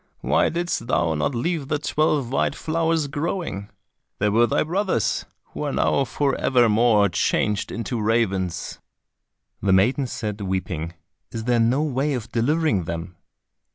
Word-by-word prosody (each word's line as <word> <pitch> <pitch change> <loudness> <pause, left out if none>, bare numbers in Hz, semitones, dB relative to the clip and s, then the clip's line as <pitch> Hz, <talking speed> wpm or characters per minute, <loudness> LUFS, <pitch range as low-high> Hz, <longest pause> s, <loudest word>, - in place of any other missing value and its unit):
Why - - +2
didst 170 -8 -2
thou 85 -9 +1
not 80 - -1
leave 155 +3 -1
the 150 - 0
twelve 145 -4 0
white - - +1
flowers 165 -1 0
growing? 145 - -3 0.5
They 105 - +1
were 115 +3 +4
thy - - +1
brothers, 175 - 0 0.3
who - - -6
are 145 -1 -1
now 140 - +2
for 140 +3 0
evermore 115 -4 +4
changed 100 +3 0
into 115 0 -3
ravens." 95 -6 0 0.8
The 95 -1 +2
maiden 125 +8 +3
said, 105 -3 -4
weeping, 90 -3 -3 0.4
"Is 115 - -5
there 120 0 +2
no 125 +6 +2
way 140 0 0
of 115 -3 -6
delivering 120 - +1
them?" 85 +2 -5
120 Hz, 145 wpm, -23 LUFS, 100-145 Hz, 0.8 s, were